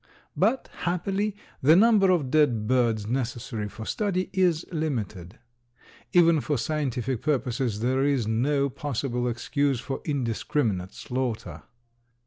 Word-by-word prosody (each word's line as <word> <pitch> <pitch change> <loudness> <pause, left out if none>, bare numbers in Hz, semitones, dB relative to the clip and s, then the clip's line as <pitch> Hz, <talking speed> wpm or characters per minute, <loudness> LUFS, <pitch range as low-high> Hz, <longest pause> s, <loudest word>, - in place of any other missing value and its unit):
But 265 - +1
happily, 195 +4 -1 0.3
the 150 +5 +6
number 205 -1 +5
of 155 -8 +1
dead 130 -8 +3
birds 115 -4 +2
necessary 120 -2 -3
for 110 +2 -8
study 185 - -1
is 175 -3 +2
limited. 110 - -3 0.7
Even 170 -3 +5
for 145 0 -1
scientific 130 -3 -2
purposes 125 -6 -1
there 130 +3 +1
is 140 -5 +1
no 140 +6 +1
possible 130 -2 -2
excuse 130 +3 0
for 135 +2 -5
indiscriminate 115 - -1
slaughter. 115 -11 -4
135 Hz, 115 wpm, -26 LUFS, 115-155 Hz, 0.7 s, the